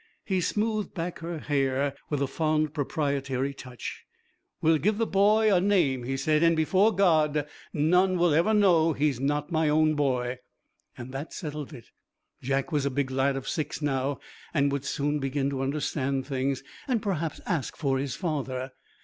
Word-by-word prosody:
He 190 Hz, -2 st, 0 dB
smoothed 215 Hz, +2 st, -1 dB
back 175 Hz, +1 st, -4 dB
her 165 Hz, 0 st, -5 dB
hair 140 Hz, -2 st, 0 dB, 0.2 s
with 145 Hz, -2 st, 0 dB
a -, -, +2 dB
fond 155 Hz, +1 st, 0 dB
proprietary 140 Hz, -2 st, -1 dB
touch. 125 Hz, -2 st, -8 dB, 0.6 s
'We'll 160 Hz, 0 st, +3 dB
give 210 Hz, +5 st, +1 dB
the 225 Hz, -, +1 dB
boy 210 Hz, +2 st, +4 dB
a 180 Hz, -, +4 dB
name,' 165 Hz, -11 st, +2 dB
he 135 Hz, +2 st, -2 dB
said, 150 Hz, +3 st, +2 dB
'and 165 Hz, 0 st, +4 dB
before 190 Hz, +7 st, +3 dB
God, 155 Hz, -7 st, +2 dB, 0.2 s
none 180 Hz, +5 st, +3 dB
will 175 Hz, -2 st, +3 dB
ever 170 Hz, +8 st, +3 dB
know 175 Hz, -6 st, +4 dB
he's 145 Hz, -3 st, 0 dB
not 145 Hz, +3 st, -1 dB
my 160 Hz, -1 st, +2 dB
own 155 Hz, +1 st, +3 dB
boy.' 130 Hz, -4 st, 0 dB, 0.6 s
That 135 Hz, +5 st, -6 dB
settled 150 Hz, -3 st, -5 dB
it. 125 Hz, -6 st, -12 dB, 0.5 s
Jack 135 Hz, +5 st, -1 dB
was 150 Hz, -3 st, +1 dB
a -, -, +1 dB
big 135 Hz, 0 st, -1 dB
lad 135 Hz, +1 st, +1 dB
of 135 Hz, -, -5 dB
six 150 Hz, -2 st, -2 dB
now, 140 Hz, -2 st, -1 dB, 0.4 s
and 140 Hz, -1 st, +3 dB
would 140 Hz, -1 st, -2 dB
soon 145 Hz, +2 st, -1 dB
begin 135 Hz, 0 st, -1 dB
to 135 Hz, -1 st, -3 dB
understand 135 Hz, -1 st, -1 dB
things, 135 Hz, -1 st, -2 dB, 0.2 s
and 250 Hz, -4 st, +1 dB
perhaps 170 Hz, -7 st, -2 dB
ask 165 Hz, -8 st, -2 dB
for 135 Hz, -4 st, 0 dB
his 135 Hz, 0 st, -3 dB
father. 135 Hz, -6 st, -3 dB
150 Hz, 170 wpm, -27 LUFS, 135-165 Hz, 0.6 s, boy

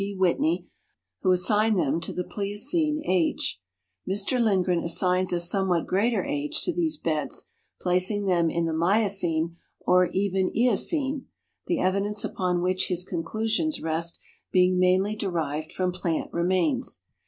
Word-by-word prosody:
D. 200 Hz, 0 st, -3 dB
Whitney, 230 Hz, -, +1 dB, 0.5 s
who 185 Hz, -, +2 dB
assigned 210 Hz, +4 st, +3 dB
them 165 Hz, -1 st, 0 dB
to -, -, -4 dB
the 180 Hz, -, -3 dB
Plioceneage. 205 Hz, -, -1 dB, 0.5 s
Mr 205 Hz, +6 st, +1 dB
Lind 195 Hz, -5 st, +2 dB
gren 180 Hz, -2 st, +1 dB
assigns 180 Hz, +2 st, +1 dB
a 175 Hz, -, 0 dB
somewhat 180 Hz, -1 st, +1 dB
greater 220 Hz, +5 st, +1 dB
age 290 Hz, +2 st, -2 dB
to 355 Hz, -, 0 dB
these 320 Hz, -3 st, 0 dB
beds, 155 Hz, -, -3 dB, 0.3 s
placing 185 Hz, +3 st, +1 dB
them 170 Hz, -3 st, +2 dB
in 170 Hz, +1 st, -1 dB
the 165 Hz, -, -1 dB
Miocene 170 Hz, -2 st, +1 dB, 0.2 s
or 180 Hz, 0 st, +4 dB
even 190 Hz, 0 st, 0 dB
Eocene, 265 Hz, -, +1 dB, 0.4 s
the 345 Hz, -4 st, 0 dB
evidence 200 Hz, +3 st, 0 dB
upon 180 Hz, -1 st, -1 dB
which 185 Hz, +1 st, +1 dB
his 180 Hz, -1 st, -1 dB
conclusions 220 Hz, -, -1 dB
rest 165 Hz, +1 st, -1 dB, 0.3 s
being 180 Hz, 0 st, +3 dB
mainly 185 Hz, +3 st, +2 dB
derived 160 Hz, -7 st, -3 dB
from 185 Hz, -1 st, -1 dB
i)Iant 170 Hz, -3 st, -3 dB
remains. 185 Hz, -, 0 dB
185 Hz, 140 wpm, -26 LUFS, 175-215 Hz, 0.5 s, or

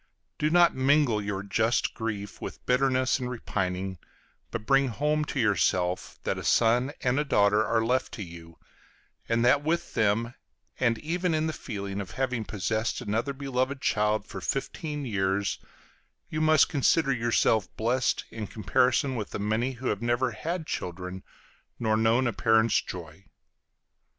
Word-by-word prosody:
Do 150 Hz, -, +2 dB
not 175 Hz, +1 st, +5 dB
mingle 130 Hz, -4 st, +3 dB
your 100 Hz, -1 st, -3 dB
just 110 Hz, +3 st, +1 dB
grief 105 Hz, -3 st, -5 dB
with -, -, -7 dB
bitterness 130 Hz, 0 st, +2 dB
and 125 Hz, -1 st, -3 dB
repining, 95 Hz, -6 st, -3 dB, 0.5 s
but 110 Hz, -2 st, -5 dB
bring 135 Hz, +2 st, +4 dB
home 150 Hz, +5 st, 0 dB
to 140 Hz, -, -3 dB
yourself 95 Hz, -5 st, +1 dB
that -, -, -1 dB
a -, -, -7 dB
son 120 Hz, +4 st, +3 dB
and 125 Hz, +2 st, +1 dB
a -, -, +2 dB
daughter 105 Hz, -6 st, +3 dB
are 115 Hz, +1 st, +1 dB
left 130 Hz, +2 st, 0 dB
to 105 Hz, -, -5 dB
you, 85 Hz, -1 st, -12 dB, 0.7 s
and 115 Hz, +1 st, +2 dB
that 140 Hz, +4 st, +4 dB
with 165 Hz, +3 st, -1 dB
them, 110 Hz, +3 st, +1 dB, 0.5 s
and 120 Hz, -2 st, +2 dB
even 170 Hz, +3 st, -1 dB
in 155 Hz, 0 st, +1 dB
the 160 Hz, -, -1 dB
feeling 100 Hz, -6 st, -5 dB
of 95 Hz, -, -7 dB
having 125 Hz, -4 st, -1 dB
possessed 110 Hz, +3 st, -2 dB
another 115 Hz, +4 st, -1 dB
beloved 135 Hz, 0 st, -2 dB
child 105 Hz, -2 st, +1 dB
for 95 Hz, -3 st, -8 dB
fifteen 145 Hz, -, -3 dB
years, 100 Hz, -3 st, 0 dB, 0.7 s
you 155 Hz, -, -1 dB
must 155 Hz, -1 st, +5 dB
consider 145 Hz, 0 st, +2 dB
yourself 115 Hz, -3 st, +2 dB
blessed 120 Hz, +3 st, 0 dB
in 110 Hz, -2 st, -5 dB
comparison 125 Hz, -, +1 dB
with 110 Hz, -4 st, -4 dB
the -, -, -4 dB
many 110 Hz, +5 st, 0 dB
who 125 Hz, +1 st, -4 dB
have 105 Hz, -, -2 dB
never 120 Hz, +2 st, +1 dB
had 160 Hz, +9 st, -4 dB
children 90 Hz, -, -5 dB, 0.6 s
nor 110 Hz, -2 st, +1 dB
known 115 Hz, +3 st, +3 dB
a 120 Hz, -, 0 dB
parent's 110 Hz, 0 st, +3 dB
joy. 85 Hz, +1 st, -9 dB
115 Hz, 155 wpm, -27 LUFS, 105-135 Hz, 0.7 s, not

